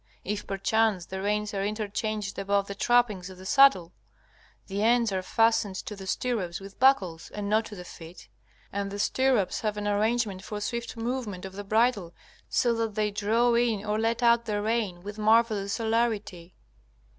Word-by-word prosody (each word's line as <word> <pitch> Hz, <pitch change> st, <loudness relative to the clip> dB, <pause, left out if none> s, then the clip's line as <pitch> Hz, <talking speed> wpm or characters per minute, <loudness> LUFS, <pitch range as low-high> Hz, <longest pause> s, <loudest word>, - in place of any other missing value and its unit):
If 205 Hz, +1 st, -3 dB
perchance 200 Hz, -1 st, +1 dB
the 190 Hz, +1 st, -6 dB
reins 210 Hz, +1 st, -1 dB
are 195 Hz, -1 st, -1 dB
interchanged 210 Hz, -1 st, -3 dB
above 200 Hz, 0 st, +1 dB
the 200 Hz, -, -6 dB
trappings 210 Hz, -4 st, +1 dB
of 185 Hz, -, -11 dB
the 185 Hz, -, -12 dB
saddle, 210 Hz, -8 st, +5 dB, 0.7 s
the 200 Hz, +1 st, -3 dB
ends 230 Hz, 0 st, +3 dB
are 190 Hz, -1 st, -1 dB
fastened 225 Hz, 0 st, +2 dB
to 210 Hz, -, -6 dB
the 190 Hz, -1 st, -9 dB
stirrups 200 Hz, -7 st, -2 dB
with 195 Hz, 0 st, -12 dB
buckles, 200 Hz, -11 st, +2 dB
and 205 Hz, -1 st, -5 dB
not 215 Hz, +2 st, +2 dB
to 210 Hz, -, -9 dB
the 180 Hz, -, -8 dB
feet. 165 Hz, +1 st, -12 dB, 0.5 s
And 200 Hz, 0 st, -2 dB
the 200 Hz, -, -6 dB
stirrups 250 Hz, -1 st, +1 dB
have 210 Hz, -1 st, -2 dB
an 205 Hz, 0 st, -3 dB
arrangement 210 Hz, -1 st, 0 dB
for 210 Hz, +1 st, -5 dB
swift 235 Hz, +3 st, -4 dB
movement 230 Hz, -6 st, -4 dB
of 190 Hz, -, -8 dB
the 205 Hz, +1 st, -6 dB
bridle, 215 Hz, -4 st, +1 dB, 0.3 s
so 240 Hz, -1 st, +2 dB
that 225 Hz, -2 st, -2 dB
they 210 Hz, -1 st, 0 dB
draw 220 Hz, +4 st, +2 dB
in 230 Hz, -3 st, +1 dB
or 210 Hz, 0 st, 0 dB
let 230 Hz, +2 st, 0 dB
out 235 Hz, 0 st, +4 dB
the 210 Hz, -2 st, -1 dB
rein 210 Hz, -5 st, -1 dB
with 205 Hz, +2 st, -7 dB
marvellous 215 Hz, -2 st, +3 dB
celerity. 220 Hz, -6 st, -1 dB
210 Hz, 180 wpm, -27 LUFS, 195-230 Hz, 0.7 s, saddle